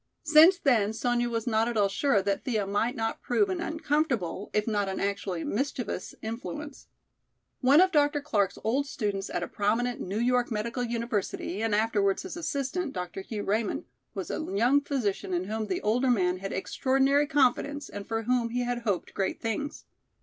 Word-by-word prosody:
Since 315 +4 +7
then 225 - +2
Sonya 240 +1 0
was 230 -1 -2
not 225 -1 +2
at 240 -2 -2
all 205 -1 +4
sure 200 +1 +1
that 200 0 -1
Thea 220 -6 0
might 205 +6 0
not 225 -2 -2
prove 395 +11 +1
an 365 -2 -2
uncomfortable 295 - -1
if 210 0 +1
not 205 -3 0
an 190 - -3
actually 200 -3 -2
mischievous 250 -1 -3
influence. 245 +7 -6 0.7
One 275 +4 +6
of 370 +1 +5
Dr. 290 -2 +3
Clark's 205 -9 0
old 265 +6 +1
students 205 -7 -3
at 175 - -2
a - - -3
prominent 230 +4 0
New 195 +3 -3
York 245 +1 +2
Medical 230 +3 -2
University 230 -4 -2
and 225 -2 +1
afterwards 205 -3 +1
his 370 - -6
assistant, 290 0 -2
Dr. 180 0 -5
Hugh 205 +1 -5
Raymond, 215 +1 -1 0.3
was 190 -2 -4
a - - -2
young 240 +9 +2
physician 215 -10 -2
in 175 - 0
whom 215 +2 -3
the 185 - -2
older 245 +5 +2
man 185 -6 +2
had 195 +1 -5
extraordinary 270 +9 +2
confidence 285 +1 +1
and 205 0 -8
for 225 0 -2
whom 240 0 +1
he 245 +1 -1
hoped 240 -6 -2
great 195 -1 -1
things. 230 +6 -3
230 Hz, 180 wpm, -28 LUFS, 205-270 Hz, 0.7 s, Since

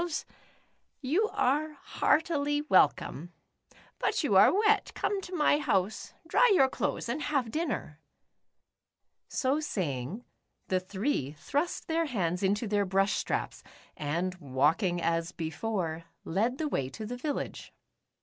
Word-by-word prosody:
152 345 -3 -3 0.7
The - - -5
Upsidedownians. - - -3
you 430 +5 +3
are 300 +4 +1
heartily 295 -3 +1
welcome. 175 - +2 0.7
But - - 0
you - - +2
are - - +8
wet, 425 +1 +2
come 405 -1 -1
to 365 -1 -7
my 300 -2 +3
house, 200 -7 -1
dry - - +4
your 270 -6 +5
clothes - - -2
and 255 +6 -2
have 270 -7 0
dinner." 285 - -3 1.3
So 270 +2 0
saying, 180 - -3 0.4
the 185 - +2
three 190 - -2
thrust 290 - -2
their 330 +1 +1
hands 180 - -1
into 205 +4 +1
their 205 0 +2
brush 195 +2 +2
straps, - - -2 0.3
and 170 +5 -2
walking 160 - +1
as 165 0 0
before, 165 -1 -3 0.2
led 220 +9 0
the 315 - -1
way 135 - -1
to 215 +10 -7
the 245 +3 -4
village. 290 +3 -4
220 Hz, 140 wpm, -30 LUFS, -, 1.3 s, are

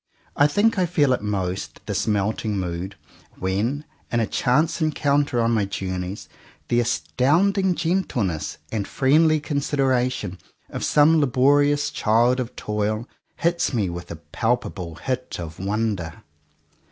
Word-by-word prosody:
I 145 - +5
think 205 +7 +2
I 180 - +2
feel 145 -6 +3
it 125 - -1
most, 95 -3 -3
this - - -2
melting 105 0 0
mood, 90 +1 -4 0.4
when, 110 +11 -1 0.3
in 120 - +1
a 115 - +2
chance 150 +10 +1
encounter 145 -4 +1
on 115 0 +2
my 110 -3 +2
journeys, 95 0 -4 0.4
the 120 - +3
astounding 150 - +2
gentleness 145 - -1
and 105 -3 -2
friendly 155 +3 +3
consideration 130 - -1 0.3
of - - -4
some 155 +2 +5
laborious 145 +2 +3
child 120 0 +2
of 125 -2 -4
toil 105 +2 -2 0.3
hits 170 -5 0
me 100 -6 0
with 85 0 -7
a 85 - -5
palpable 90 -1 -2
hit 130 - -4
of 80 -2 -7
wonder. 100 -4 -2
120 Hz, 130 wpm, -23 LUFS, 100-145 Hz, 0.4 s, I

